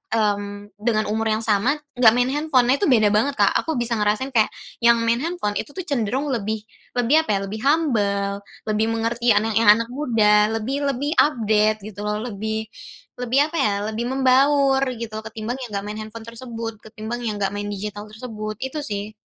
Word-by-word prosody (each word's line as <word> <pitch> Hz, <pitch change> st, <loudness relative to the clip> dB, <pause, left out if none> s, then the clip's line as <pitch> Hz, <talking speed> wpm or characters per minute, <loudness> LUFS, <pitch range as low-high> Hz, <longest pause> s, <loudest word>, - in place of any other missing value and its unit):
mmm, 205 Hz, -1 st, -2 dB
dengan 215 Hz, -1 st, +1 dB
umur 225 Hz, +1 st, 0 dB
yang 225 Hz, -, -4 dB
sama, 220 Hz, +6 st, +2 dB, 0.2 s
enggak 225 Hz, -3 st, +8 dB
main 250 Hz, +1 st, +2 dB
handphone. 295 Hz, -4 st, +2 dB
Nah -, -, +5 dB
itu 395 Hz, -, +3 dB
beda 215 Hz, -5 st, +4 dB
banget, 275 Hz, +7 st, +2 dB
Kak. -, -, +4 dB
Aku 320 Hz, -, -3 dB
bisa 240 Hz, -1 st, -1 dB
ngerasain 210 Hz, +6 st, 0 dB
kayak 220 Hz, -2 st, +3 dB, 0.3 s
yang 235 Hz, 0 st, +6 dB
main 230 Hz, +1 st, +2 dB
handphone, 330 Hz, -11 st, -2 dB
itu -, -, -5 dB
tuh 370 Hz, -, -4 dB
cenderung 270 Hz, -, -1 dB
lebih 220 Hz, -1 st, -2 dB, 0.3 s
lebih 265 Hz, +7 st, +4 dB
apa 320 Hz, -, -12 dB
ya, -, -, -2 dB
lebih 215 Hz, +2 st, -6 dB
humble, 210 Hz, -10 st, +1 dB, 0.3 s
lebih 215 Hz, 0 st, +1 dB
mengerti 230 Hz, 0 st, +1 dB
anak 220 Hz, +1 st, +1 dB
yang 220 Hz, -2 st, +5 dB
anak 230 Hz, +1 st, -2 dB
muda, 215 Hz, -6 st, +3 dB
lebih 265 Hz, +6 st, -2 dB
lebih 275 Hz, +3 st, -2 dB
update 215 Hz, -6 st, +3 dB
gitu 205 Hz, -1 st, -8 dB
loh, 210 Hz, 0 st, -1 dB
lebih 220 Hz, 0 st, -3 dB, 0.6 s
lebih 250 Hz, +2 st, +1 dB
apa 335 Hz, -, -3 dB
ya, 205 Hz, -, +2 dB, 0.2 s
lebih 230 Hz, +2 st, -3 dB
membaur 270 Hz, +1 st, +3 dB, 0.2 s
gitu 230 Hz, -2 st, -6 dB, 0.2 s
ketimbang 225 Hz, +4 st, -5 dB
yang 245 Hz, -, -6 dB
enggak 200 Hz, -, -2 dB
main 210 Hz, +1 st, -5 dB
handphone 220 Hz, +1 st, -9 dB
tersebut, 230 Hz, -1 st, -6 dB
ketimbang 220 Hz, +2 st, -6 dB
yang 220 Hz, -3 st, -2 dB
enggak 195 Hz, -1 st, -1 dB
main 205 Hz, 0 st, -4 dB
digital 205 Hz, +1 st, -5 dB
tersebut, 215 Hz, -1 st, -6 dB
itu 285 Hz, +4 st, -4 dB
sih. 205 Hz, -3 st, -5 dB
225 Hz, 190 wpm, -22 LUFS, 210-255 Hz, 0.6 s, enggak